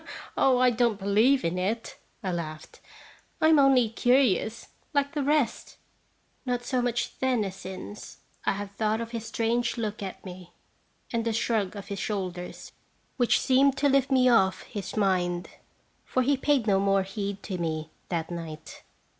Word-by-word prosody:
" - - -14
"Oh, 260 -2 +4
I 250 0 +4
don't 235 -2 +1
believe 215 +7 +3
in 170 +2 -1
it," 215 +5 -3 0.2
I 190 - -1
laughed; 155 -3 -6 0.6
"I 315 - +4
am 315 -2 +6
only 270 -4 +5
curious, 230 -1 +1 0.3
like 285 +1 +1
the 295 - -1
rest." 290 -2 0 0.7
Not 245 -1 -2
so 255 0 0
much 240 -1 -2
then 255 -4 +1
as 190 -2 -5
since, 190 +2 -8 0.3
I - - +1
have 200 0 -6
thought 215 +2 0
of 230 0 -5
his 230 -1 -5
strange 235 +2 0
look 215 -2 -3
at 195 0 -7
me, 180 -1 -10 0.6
and 230 -1 0
the 230 0 -1
shrug 220 -3 0
of 200 0 -8
his 200 -1 -4
shoulders, 185 -4 -4 0.5
which 245 -2 +3
seemed 270 +1 +3
to 285 +1 +3
lift 275 0 +3
me 260 -2 +4
off 195 -6 +3
his 205 +1 -6
mind, 180 -3 +1 0.5
for 255 - 0
he 280 +3 +3
paid 270 -3 +1
no 195 -3 +3
more 195 0 +2
heed 200 0 -5
to 185 -3 -4
me 155 -2 -3 0.2
that 165 -1 -2
night. 165 -3 -7
220 Hz, 170 wpm, -27 LUFS, 190-250 Hz, 0.7 s, am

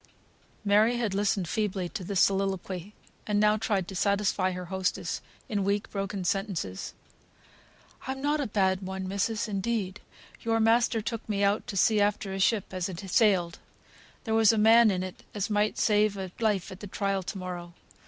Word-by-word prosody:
Mary 215 +4 +4
had 225 -5 -1
listened 200 -2 0
feebly 195 -2 -1
to 190 +2 -6
this 195 +1 -1
soliloquy, 195 0 0 0.3
and 210 -1 +1
now 210 0 +4
tried 205 -4 -1
to 195 - -7
satisfy 200 0 +1
her 180 0 -5
hostess 190 +1 -2 0.3
in 205 -6 -1
weak, 200 +1 -1
broken 195 -1 -3
sentences. 190 - -2 1.1
"I'm 265 0 -3
not 295 +2 0
a 275 - -1
bad 190 -2 +1
one, 190 0 -5
missis, 200 +4 -1
indeed. 200 -1 -2 0.4
Your 225 0 +1
master 225 0 +3
took 225 +1 -5
me 200 -1 0
out 200 +1 +1
to 195 - -4
sea 210 +2 +4
after 205 -1 0
a 195 - -4
ship 200 0 +1
as 185 -1 -2
had 180 -3 -7
sailed. 185 -7 +3 0.6
There 220 - -2
was 225 -1 +6
a 225 - 0
man 225 +1 +6
in 185 -2 0
it 185 -1 -7
as 210 +1 -2
might 210 +1 +1
save 210 -1 +2
a 190 -2 -5
life 210 -5 0
at 190 - -9
the 205 - -7
trial 195 0 -1
to 190 +2 -6
morrow. 175 -2 -6
200 Hz, 180 wpm, -28 LUFS, 190-215 Hz, 1.1 s, was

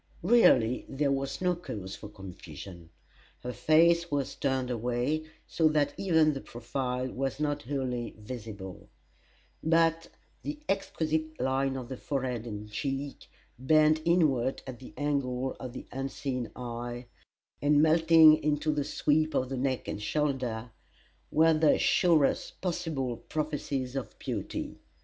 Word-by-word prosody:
Really 130 - +5
there 140 +1 0
was 135 +1 -2
no 180 -1 +2
cause 100 - -7
for 105 - -10
confusion. 90 -3 -10 0.5
Her 125 0 -5
face 170 +4 +4
was 140 -2 -1
turned 130 -2 -1
away, 125 +6 -1 0.2
so 160 - +2
that 150 -2 +1
even 160 -5 +3
the 135 - -5
profile 125 +1 -3
was 135 +2 -3
not 145 -1 -1
wholly 125 -3 -3
visible; 105 -4 -8 0.7
but 165 0 +2 0.3
the 295 0 -4
exquisite 155 -5 -1
line 135 +1 0
of 125 -2 -6
the 130 0 -6
forehead 125 -5 -3
and 105 -1 -7
cheek, 135 +4 -4 0.3
bent 155 +3 +4
inward 150 -7 +2
at 130 -2 -8
the 130 - -11
angle 135 -3 -1
of 130 -2 -6
the - - -8
unseen 135 -2 -3
eye, 120 0 -5 0.6
and 145 0 +4
melting 160 0 +6
into 150 +1 +1
the 150 -1 0
sweep 155 +2 +1
of 125 - +1
the 135 - -3
neck 130 -2 -1
and 105 - -4
shoulder, 125 -2 -1 0.6
were 160 +1 +5
the 155 -1 +4
surest 165 -5 +2
possible 160 -9 -2
prophecies 145 -4 -3
of 135 -3 -5
beauty. - - -4
135 Hz, 135 wpm, -29 LUFS, 125-155 Hz, 0.7 s, melting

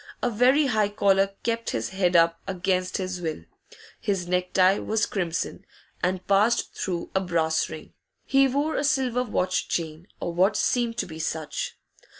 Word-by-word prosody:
A 245 - +1
very 255 +7 +4
high 215 -6 +2
collar 195 -1 +2
kept 230 0 -1
his 115 - -2
head 185 -2 0
up 165 0 +4
against 185 0 -1
his 185 -1 -4
will; 160 - -4 0.6
his 190 -4 -1
necktie 180 +2 +3
was 220 0 0
crimson, 175 -4 -3 0.4
and 185 +1 -1
passed 210 +4 +2
through 175 -3 -4
a 190 - +2
brass 165 -3 0
ring; 155 - -9 0.3
he 270 0 +4
wore 285 +4 0
a - - 0
silver 265 -4 +1
watch 185 -6 -1
chain, 160 +1 -3
or 175 - -3
what 190 +4 +3
seemed 235 -2 0
to - - -1
be 160 -2 -9
such. 160 -1 -3
190 Hz, 160 wpm, -25 LUFS, 175-230 Hz, 0.6 s, very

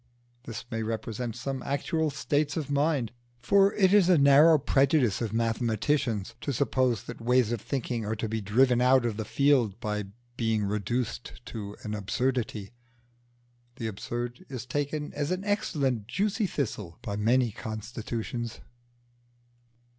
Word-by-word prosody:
This 115 -1 -6
may 115 -1 -2
represent 115 +1 -3
some 130 +2 -4
actual 155 +3 -1
states 145 +1 -1
of 145 -3 -3
mind, 140 -5 +1 0.3
for 195 +10 +4
it 190 -2 +4
is 200 -3 +6
a 180 - +6
narrow 145 +3 +7
prejudice 135 - +2
of 115 - -1
mathematicians 115 0 0
to 140 - -2
suppose 130 -3 +1
that - - -9
ways 125 -1 +3
of 120 -3 -2
thinking 125 -3 -2
are 105 +1 -2
to 110 +1 -3
be 110 0 -2
driven 120 +4 +3
out 130 0 +5
of 115 -3 -1
the 110 0 -4
field 125 -5 +2
by 105 -3 -2 0.3
being 110 -2 +1
reduced 105 +4 -2
to 105 -3 -6
an 105 - -4
absurdity. 115 -1 -2 1.0
The 120 - -5
Absurd 120 +3 -4
is 125 -3 -6
taken 145 +3 -3
as 145 0 -2
an 185 +1 -1
excellent 140 - 0
juicy 205 - 0
thistle 105 - -4
by 100 - -3
many 120 +3 +2
constitutions. 115 +2 -5
120 Hz, 145 wpm, -28 LUFS, 110-140 Hz, 1.0 s, narrow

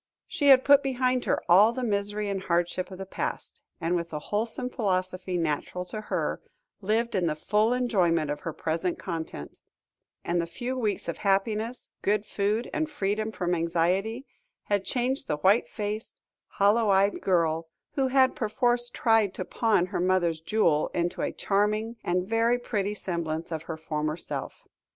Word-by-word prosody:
She 310 -7 -1
had 265 -2 +7
put 285 0 +7
behind 255 -2 0
her - - +1
all 200 +6 +6
the 255 - -3
misery 205 -1 -1
and 195 -1 -2
hardship 175 0 0
of 190 - -9
the 195 - -6
past, 190 - -5 0.2
and, 165 +2 0
with 170 -1 -2
the 155 - -4
wholesome 220 +9 -2
philosophy 185 -5 -1
natural 165 +2 -2
to 215 +4 -6
her, 215 - -2 0.4
lived 225 +4 0
in 185 -4 +1
the 155 - 0
full 210 +8 +1
enjoyment 180 - +1
of 145 - -3
her 165 - -4
present 165 +3 -2
content; 160 - -6 0.7
and 175 0 +1
the 170 - -4
few 245 +9 -4
weeks 220 -5 -2
of - - -4
happiness, 215 +4 0
good 210 +1 +1
food, 210 +4 -1
and 315 0 -1
freedom 215 -5 -1
from 180 -4 -1
anxiety, 180 +9 0 0.4
had 200 -2 0
changed 260 +2 0
the 150 - -1
white 190 +3 +3
faced, 210 +4 -5 0.3
hollow 210 +2 +3
eyed 195 +1 +3
girl 165 -3 +1 0.2
who 270 -2 +1
had 260 0 +4
perforce 240 +2 +1
tried 225 -5 +2
to 185 - -4
pawn 220 -6 +2
her 185 0 -3
mother's 175 -3 +1
jewel, 165 -4 +2
into 175 0 -1
a - - -1
charming, 210 +3 0
and 180 +1 0
very 230 +2 +2
pretty 210 -4 -2
semblance 170 -4 -3
of 160 -1 -3
her 160 - -3
former 155 0 -2
self. - - -6
200 Hz, 170 wpm, -27 LUFS, 175-225 Hz, 0.7 s, had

